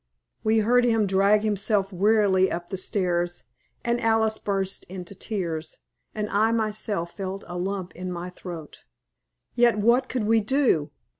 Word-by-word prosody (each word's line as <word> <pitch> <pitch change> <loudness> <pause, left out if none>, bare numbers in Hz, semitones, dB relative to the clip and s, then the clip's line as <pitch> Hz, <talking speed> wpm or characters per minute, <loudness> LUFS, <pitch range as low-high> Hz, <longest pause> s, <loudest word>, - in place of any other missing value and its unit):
We 220 +1 +3
heard 245 +2 +4
him 225 -3 +3
drag 200 +2 +3
himself 205 -1 0
wearily 195 -1 +3
up 175 0 -5
the - - -1
stairs, 175 -4 -1 0.4
and 235 0 0
Alice 225 -1 +2
burst 195 -1 -2
into 180 0 -8
tears, 180 -6 -3 0.4
and 210 -1 -2
I 215 +3 +3
myself 210 -5 -2
felt 195 0 -5
a 175 - -7
lump 185 0 -3
in 180 +1 -5
my 175 +1 -5
throat. 175 -4 -9 0.7
Yet 240 -2 +4
what 240 +5 +3
could 250 -4 -1
we 225 +2 +4
do? 215 - +2
200 Hz, 150 wpm, -25 LUFS, 180-220 Hz, 0.7 s, heard